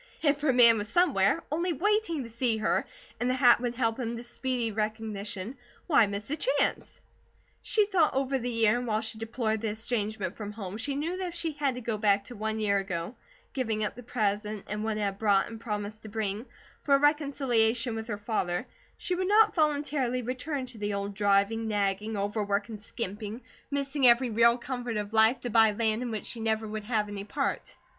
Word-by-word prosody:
If 290 -1 +2
her 295 -2 +3
man 235 -3 +7
was 205 +1 -4
somewhere, 320 - +3
only 340 +3 0
waiting 395 -3 +1
to 230 - -9
see 235 -1 0
her, 215 - 0 0.3
and 245 - 0
the 255 - +2
hat 245 -2 +6
would 245 -1 -2
help 230 -1 0
him 235 -1 -3
to 235 - -7
speedy 240 -1 -2
recognition, 215 +1 -4 0.3
why 275 -10 +5
miss 200 +5 -5
a - - +1
change? - - +1 0.7
She 425 -2 +3
thought 365 -9 +2
over 270 0 0
the 245 0 -3
year, 230 0 +2
and 245 - -5
while 215 -1 +1
she 220 0 -3
deplored 225 -1 -2
the 225 - -1
estrangement 215 -3 -2
from 210 -1 -7
home, 200 -2 -6
she 275 +5 -2
knew 330 +6 -2
that 375 -1 -3
if 345 - -7
she 335 -1 -2
had 285 -3 -1
to 250 - -6
go 225 -2 -3
back 200 -1 +3
to 245 +4 -9
one 220 +1 -2
year 200 -2 +2
ago, 180 0 -4 0.4
giving 225 -5 -1
up 210 - -1
the 245 - -10
present 210 -3 -2
and 210 +1 -3
what 220 -1 -1
it - - -2
had 200 -1 -2
brought 200 -3 +3
and 225 -1 -9
promised 210 -1 -4
to 215 - -9
bring, 215 +2 -3 0.4
for 280 - +4
a - - +3
reconciliation 265 -6 +2
with 220 0 -5
her 210 -3 -3
father, 205 -2 -2 0.3
she 365 - -2
would 370 +1 -1
not 430 +1 +5
voluntarily 290 -5 0
return 260 +3 -3
to 245 -3 -10
the 205 0 -2
old 200 0 -3
driving, 205 +2 +2
nagging, 205 +1 -1
overwork, 205 0 -1
and 215 -2 -7
skimping, 210 0 -5 0.3
missing 280 -1 +2
every 240 +1 +5
real 235 +2 +5
comfort 245 -2 -4
of 210 +1 -4
life 220 +3 +5
to 245 - -4
buy 225 0 +6
land, 220 +1 0
in 250 - -3
which 220 -2 -4
she 235 - -5
never 220 0 0
would 215 0 -5
have 215 -2 0
any 205 -1 -5
part. 275 +7 -3
225 Hz, 210 wpm, -28 LUFS, 210-260 Hz, 0.7 s, man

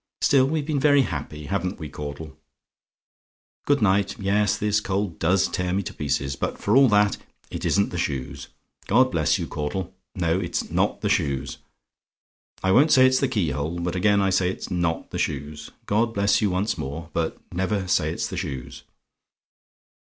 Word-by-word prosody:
Still 135 -2 +4
we've 150 0 -1
been 150 -2 -1
very 145 -1 +5
happy, 75 - -5
haven't 95 +2 -2
we, 80 - -6
Caudle? 75 +1 -7 1.3
"Good 145 -5 +3
night. 100 0 +1
Yes, 100 +1 +1
this 105 0 +1
cold 100 -3 -2
does 90 +3 +2
tear 90 -1 -2
me 100 +1 0
to - - -6
pieces; 70 -1 -2
but - - -3
for 105 - +1
all 135 -1 +7
that, 105 -1 +3 0.3
it - - -5
isn't 100 0 +2
the 90 - -3
shoes. 70 -2 -4 0.4
God 130 +5 +4
bless 80 -4 +2
you, - - -3
Caudle; 85 +5 -4 0.2
no, 85 -1 +1
it's 90 -3 -3
NOT - - 0
the - - 0
shoes. 70 -2 -1 1.0
I 95 - +2
won't 145 +10 +5
say 130 -1 +7
it's 130 0 +4
the 135 - +1
key 105 - 0
hole; 75 +5 -3
but 85 +1 -2
again 100 +2 +3
I 95 -1 +2
say, 90 -1 +2
it's 95 - -6
not 85 -2 -1
the - - -4
shoes. 75 +1 -4 0.2
God 115 +2 0
bless 100 +2 +2
you 105 - +2
once 95 +4 -1
more 80 +5 -6
But 80 -1 -1 0.2
never 95 +2 -1
say 80 -4 +1
it's 85 - -3
the 95 - -6
shoes." 70 -9 -5
95 Hz, 180 wpm, -24 LUFS, 80-105 Hz, 1.3 s, all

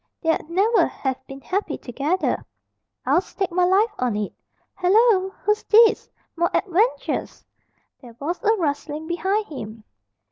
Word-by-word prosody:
They'd 325 -1 0
never 405 +7 +3
have 265 -1 -4
been 270 0 -9
happy 395 +7 -2
together, 285 +9 -1 0.6
I'll 350 - +3
stake 385 -1 -4
my 360 +1 +2
life 410 +5 +3
on 245 -4 0
it. 210 -1 -3 0.4
Hallo! 385 +1 +3
Who's 420 0 +1
this? 450 +1 +5 0.3
More 340 +1 +1
adventures!" 410 +6 0 0.6
There 240 -4 -13
was 335 +5 -3
a 440 0 +4
rustling 300 -3 -3
behind 380 +6 -1
him. 220 - -8
355 Hz, 135 wpm, -23 LUFS, 285-410 Hz, 0.6 s, this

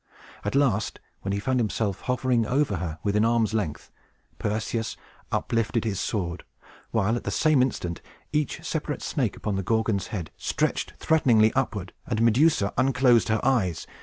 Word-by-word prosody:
At - - -2
last, 115 -7 +1 0.2
when 100 - -3
he 100 - 0
found 130 +5 0
himself 105 -3 -1
hovering 125 -2 +1
over 130 -6 +1
her 80 -2 -4
within 105 +1 +2
arm's 115 -2 +2
length, 100 -9 -3 0.5
Perseus 110 +1 -2 0.3
uplifted 115 0 0
his 100 -4 -1
sword, 90 -4 -2 0.5
while, 105 +4 +1
at 120 - -4
the - - -2
same 155 -4 +3
instant, 90 -9 -1 0.3
each 150 -2 -1
separate - - -3
snake - - -1
upon 105 -3 -2
the - - 0
Gorgon's 110 -1 0
head 90 -7 -5
stretched - - -1
threateningly 115 -9 +4
upward, 110 -8 -2
and 110 -3 -1
Medusa 115 -2 +3
unclosed 130 -2 +4
her 110 -1 +2
eyes. 105 - +1
110 Hz, 155 wpm, -26 LUFS, 100-125 Hz, 0.5 s, threateningly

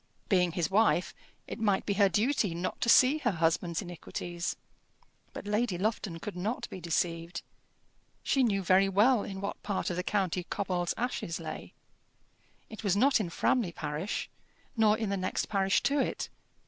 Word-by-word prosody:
Being 180 -4 +3
his 170 -2 -1
wife, 190 -5 +3 0.3
it - - -6
might 205 -3 +1
be 200 - 0
her 200 -1 +4
duty 210 -1 +1
not 175 +2 -4
to 235 - +1
see 265 +6 +6
her 255 - +1
husband's 170 +2 0
iniquities. 175 0 -5 0.8
But - - -8
Lady 210 -2 0
Lufton 200 -3 -2
could 200 +4 -7
not 205 +7 -3
be 185 - -7
deceived. 170 0 -2 0.8
She 270 - +2
knew 200 -6 +2
very 190 +2 +4
well 215 +5 +4
in 195 -1 -6
what 200 - -4
part 200 -3 -2
of - - -2
the - - +1
county 185 -2 -1
Cobbold's 180 -4 -2
Ashes 230 -9 -2
lay. 160 -1 -7 0.9
It 220 0 -10
was 200 -2 +2
not 265 +3 +4
in 195 -5 -2
Framley 200 +2 +1
parish, 155 +4 -3 0.5
nor 215 -2 +4
in 220 -2 -2
the 200 - 0
next 185 0 -2
parish 195 -2 +2
to 285 +1 +2
it. - - -1
195 Hz, 170 wpm, -30 LUFS, 175-215 Hz, 0.9 s, see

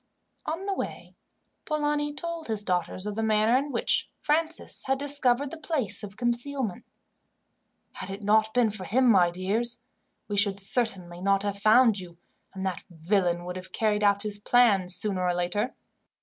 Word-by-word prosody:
On 335 +5 -3
the 400 - -1
way, - - -6 0.5
Polani 295 -1 0
told 335 +2 -5
his 215 -2 0
daughters 185 0 -2
of 210 - -3
the 225 - -3
manner 220 +1 +3
in 280 +2 0
which 235 - 0
Francis 320 +2 -1
had 270 0 +1
discovered 280 -1 +1
the 330 - -8
place 265 - -1
of 200 -1 -9
concealment. 240 -2 -2 1.1
"Had - - -7
it 195 +2 -7
not 215 +1 +3
been 235 -2 +2
for 195 -3 -5
him, 255 +6 +2
my 180 -4 +5
dears, 200 +7 -1 0.5
we 205 - -3
should 200 -1 +3
certainly 195 -5 -1
not 195 +1 +2
have 200 -1 -3
found 220 0 +5
you, 175 -2 -11 0.3
and 190 0 -6
that 185 -3 -3
villain 175 +1 0
would 180 +1 -5
have 185 0 -9
carried 210 -2 +1
out 200 0 +3
his 205 -1 -2
plans, 205 -6 +4
sooner 200 -3 +1
or 180 -1 +1
later. 190 +8 -1
215 Hz, 170 wpm, -27 LUFS, 195-255 Hz, 1.1 s, my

